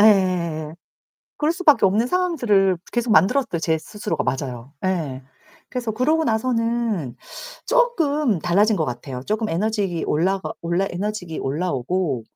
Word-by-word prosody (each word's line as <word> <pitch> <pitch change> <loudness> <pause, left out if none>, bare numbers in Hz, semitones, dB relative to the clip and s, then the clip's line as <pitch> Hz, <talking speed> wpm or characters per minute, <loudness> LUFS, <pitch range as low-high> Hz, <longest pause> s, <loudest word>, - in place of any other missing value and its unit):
예. 180 -7 +3 0.6
그럴 305 +2 +1
수 365 +2 -7
밖에 300 -9 +6
없는 210 +5 +2
상황들을 240 - +2
계속 240 -1 0
만들었어요, 200 - +3
제 160 -1 +1
스스로가. 205 +6 -4
맞아요. 130 -1 -3
예. 155 -9 -1 0.5
그래서 245 -3 -3
그러고 300 +9 +1
나서는 230 - 0 0.5
쪼끔 305 - +2
달라진 200 +6 +3
것 160 - +1
같아요. 125 0 -5
쪼금 215 +1 -1
에너지 195 -1 -1
올라가 185 +5 0
올라 170 +3 0
에너지가 185 -2 -4
올라 160 +7 -1
오고 135 -1 -1
195 Hz, 310 characters per minute, -22 LUFS, 165-235 Hz, 0.6 s, 밖에